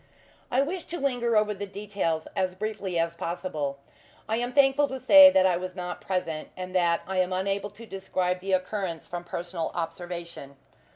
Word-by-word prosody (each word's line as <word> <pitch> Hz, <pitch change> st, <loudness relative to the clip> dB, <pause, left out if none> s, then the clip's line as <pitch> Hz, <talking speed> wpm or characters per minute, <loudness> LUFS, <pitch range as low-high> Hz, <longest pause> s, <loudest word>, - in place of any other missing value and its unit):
I 255 Hz, -, +3 dB
wish 340 Hz, +4 st, -4 dB
to 345 Hz, -, -5 dB
linger 245 Hz, -5 st, +1 dB
over 210 Hz, 0 st, +2 dB
the 205 Hz, 0 st, -6 dB
details 195 Hz, -5 st, -2 dB
as 185 Hz, -1 st, 0 dB
briefly 200 Hz, -3 st, -3 dB
as 165 Hz, 0 st, +1 dB
possible. 170 Hz, -5 st, -3 dB, 0.5 s
I 220 Hz, -, 0 dB
am 245 Hz, +1 st, -2 dB
thankful 280 Hz, +1 st, +4 dB
to 265 Hz, -1 st, -5 dB
say 285 Hz, +2 st, +9 dB
that 190 Hz, -9 st, +4 dB
I 180 Hz, -2 st, +3 dB
was 185 Hz, 0 st, -6 dB
not 180 Hz, -1 st, -5 dB
present, 180 Hz, -5 st, -3 dB
and 185 Hz, 0 st, -6 dB
that 170 Hz, -2 st, +2 dB
I 190 Hz, 0 st, -1 dB
am 185 Hz, 0 st, +1 dB
unable 195 Hz, +2 st, -1 dB
to 215 Hz, +3 st, -12 dB
describe 185 Hz, -2 st, -2 dB
the 190 Hz, +1 st, -2 dB
occurrence 185 Hz, -2 st, -2 dB
from 175 Hz, 0 st, -5 dB
personal 170 Hz, -1 st, -4 dB
observation. 170 Hz, -4 st, -5 dB
185 Hz, 180 wpm, -27 LUFS, 175-215 Hz, 0.5 s, say